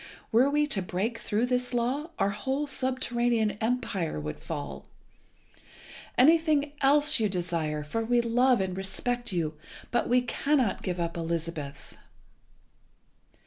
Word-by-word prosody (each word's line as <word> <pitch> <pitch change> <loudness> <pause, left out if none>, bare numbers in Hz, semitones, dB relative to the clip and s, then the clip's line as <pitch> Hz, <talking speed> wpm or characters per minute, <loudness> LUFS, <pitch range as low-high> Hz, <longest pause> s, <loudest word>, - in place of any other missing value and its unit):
Were 245 +5 +5
we 295 +1 +2
to 210 -9 -1
break 195 +6 -2
through 220 +3 0
this 250 0 -1
law 260 +7 -1
our 195 - +1
whole 265 +8 -2
subterranean 245 -5 0
empire 215 - -1
would 75 0 -5
fall. 65 0 -6 1.3
Anything 305 +1 +4
else 290 +1 +5
you 215 -2 +2
desire, 165 -5 -2
for 225 +10 -2
we 240 +2 +2
love 245 +1 +3
and 185 -1 -2
respect 240 +6 -3
you, 165 -4 -1 0.4
but 240 - 0
we 250 +1 +4
cannot 260 -2 0
give 180 -1 -3
up 170 0 -2
Elizabeth." 165 -3 -4
235 Hz, 130 wpm, -28 LUFS, 180-255 Hz, 1.3 s, Were